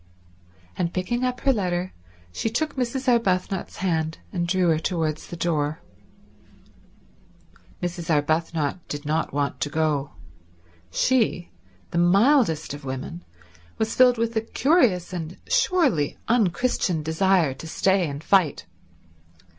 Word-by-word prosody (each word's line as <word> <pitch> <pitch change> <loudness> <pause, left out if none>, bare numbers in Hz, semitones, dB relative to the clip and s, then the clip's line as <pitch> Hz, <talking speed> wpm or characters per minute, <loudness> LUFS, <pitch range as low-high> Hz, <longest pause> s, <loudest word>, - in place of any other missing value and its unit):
And 170 -1 -2
picking 240 +7 -1
up 250 0 -1
her 270 - +3
letter 180 -4 -2 0.4
she 155 - -2
took 300 +7 -2
Mrs. 260 +1 -2
Arbuthnot's 195 -6 +1
hand 160 -3 -1 0.2
and 175 -2 -1
drew 180 0 +2
her 160 -1 +2
towards 160 -3 -2
the - - -7
door. 155 -2 -1 2.0
Mrs. 175 -1 -4
Arbuthnot 155 +1 0
did 145 0 -6
not 155 +2 -1
want 140 0 -2
to 145 - -1
go. 150 -2 -1 0.8
She, 210 - +1 0.4
the 170 - 0
mildest 195 - +3
of 145 0 -9
women, 130 -10 -6 0.5
was 220 +1 -1
filled 250 -1 +5
with 230 0 -1
a 220 - +2
curious 225 - +2
and 170 0 -5
surely 365 - +2
unchristian 200 -6 +1
desire 160 -1 +2
to 135 +5 -10
stay 190 +1 +1
and 140 +2 -7
fight. 185 - +2
175 Hz, 125 wpm, -24 LUFS, 155-225 Hz, 2.0 s, filled